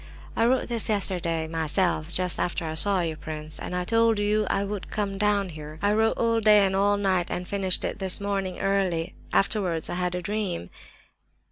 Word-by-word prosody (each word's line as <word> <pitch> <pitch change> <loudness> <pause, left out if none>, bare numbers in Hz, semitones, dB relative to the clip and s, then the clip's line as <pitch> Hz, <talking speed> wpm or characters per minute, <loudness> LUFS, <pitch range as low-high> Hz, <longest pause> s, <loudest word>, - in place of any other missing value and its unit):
"I 230 - +3
wrote 255 +1 +1
this 235 -2 0
yesterday, 175 -6 -1
myself, 160 +1 -1
just 180 0 -1
after 175 -1 -1
I 155 - -3
saw 190 +3 +4
you, 165 -2 -2
prince, 155 0 -5
and 180 0 -4
told 230 -1 +3
you 210 0 +1
I 195 - +1
would 200 -1 -5
come 200 -2 -3
down 205 -2 +1
here. 155 -1 -9
I 205 +3 +2
wrote 220 +1 +2
all 230 -1 +1
day 210 -2 +6
and 190 0 0
all 205 +1 +2
night, 190 -3 0
and 180 0 -4
finished 195 -2 +1
it - - -3
this 190 -2 +2
morning 195 -2 -3
early. 190 -4 0 0.2
Afterwards 185 -5 +1
I - - -2
had 180 0 -1
a 180 - -3
dream." 200 - -3
195 Hz, 195 wpm, -26 LUFS, 175-205 Hz, 0.2 s, day